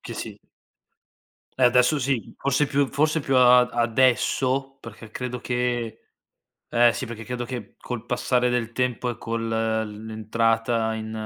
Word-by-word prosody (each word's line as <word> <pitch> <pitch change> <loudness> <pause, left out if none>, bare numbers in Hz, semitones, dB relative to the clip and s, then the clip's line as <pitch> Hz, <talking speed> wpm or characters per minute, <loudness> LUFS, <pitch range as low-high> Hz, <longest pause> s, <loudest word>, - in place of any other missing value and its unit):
che - - -8
si - - -7 1.2
Eh, - - +6
adesso 125 +4 +4
sì. 130 -6 -2
Forse 140 +1 +1
più 140 0 +2
forse 155 +4 +1
più 135 -2 -1
a 125 0 +7
ad 125 0 +1
adesso, 130 +3 +1
perché 110 -1 -12
credo 125 +1 -5
che 120 -2 -2 0.7
eh 120 0 +4
sì, 130 - -4
perché 115 -1 -8
credo 125 -1 -4
che 120 -5 -7
col 120 -1 -6
passare 125 0 +1
del 120 -2 -1
tempo 125 0 -1
e 120 -1 -4
col 115 0 -3
il 110 -1 -2
l'entrata 115 +1 0
in 110 0 -6
120 Hz, 155 wpm, -24 LUFS, 115-125 Hz, 1.2 s, a